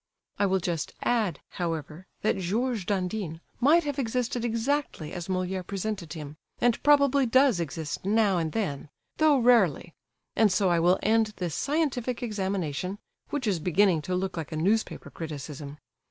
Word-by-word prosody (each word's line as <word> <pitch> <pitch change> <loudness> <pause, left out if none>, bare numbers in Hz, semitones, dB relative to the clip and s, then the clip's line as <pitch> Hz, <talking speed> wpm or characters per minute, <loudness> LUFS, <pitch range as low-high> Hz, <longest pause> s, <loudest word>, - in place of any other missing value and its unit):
I 200 - +3
will 190 0 +2
just 170 -3 -3
add, 215 -10 0
however, 165 0 -4 0.2
that 215 - +2
Georges 215 +3 -1
Dandin 185 -4 -2 0.2
might 305 +7 +5
have 285 -2 -3
existed 245 -1 -1
exactly 235 - -1
as 175 -2 -5
Molière 185 -1 -2
presented 195 -4 -4
him, 150 -2 -8 0.2
and 240 -2 +2
probably 280 -2 +4
does 255 -4 +4
exist 160 -2 -4
now 200 -2 +3
and 160 -1 -2
then, 150 -9 -3 0.3
though 310 -2 +5
rarely; 220 - +3 0.4
and 220 -3 +4
so 190 0 +2
I 170 -1 +3
will 175 +3 +4
end 220 0 +2
this 175 -4 -3
scientific 260 - -1
examination, 190 -5 -2 0.3
which 290 -4 -2
is 195 -6 +1
beginning 180 0 +3
to 180 +5 -2
look 185 0 -2
like 160 -1 -5
a 155 - -3
newspaper 205 +7 0
criticism. 150 -2 -7
195 Hz, 155 wpm, -27 LUFS, 170-235 Hz, 0.4 s, might